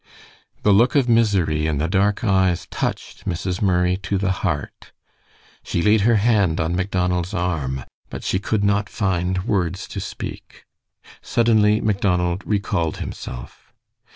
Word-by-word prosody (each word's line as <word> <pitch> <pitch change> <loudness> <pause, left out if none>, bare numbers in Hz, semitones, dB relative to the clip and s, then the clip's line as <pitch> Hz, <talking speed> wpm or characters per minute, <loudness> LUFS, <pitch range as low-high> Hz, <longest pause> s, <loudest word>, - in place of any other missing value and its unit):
The 105 - +5
look 120 +8 +4
of 135 -4 +3
misery 100 -10 +2
in 75 -2 0
the 75 +3 0
dark 100 +4 +1
eyes 95 -5 +2
touched - - -4
Mrs. 90 0 -2
Murray 90 -2 +2
to 95 +1 -2
the 95 0 0
heart. 80 -6 -4 0.7
She 85 - -1
laid 105 0 +4
her 115 +3 +4
hand 100 -6 +2
on 80 +2 0
Macdonald's 90 0 -1
arm, 75 -8 -2 0.3
but - - -7
she 95 - 0
could 105 0 -1
not 100 +1 +1
find 90 -3 -1
words 95 -5 -1
to - - -5
speak. - - -8 0.6
Suddenly 110 -2 +3
Macdonald 90 -3 0
recalled 100 -6 -1
himself. - - -8
95 Hz, 140 wpm, -21 LUFS, 90-105 Hz, 0.7 s, The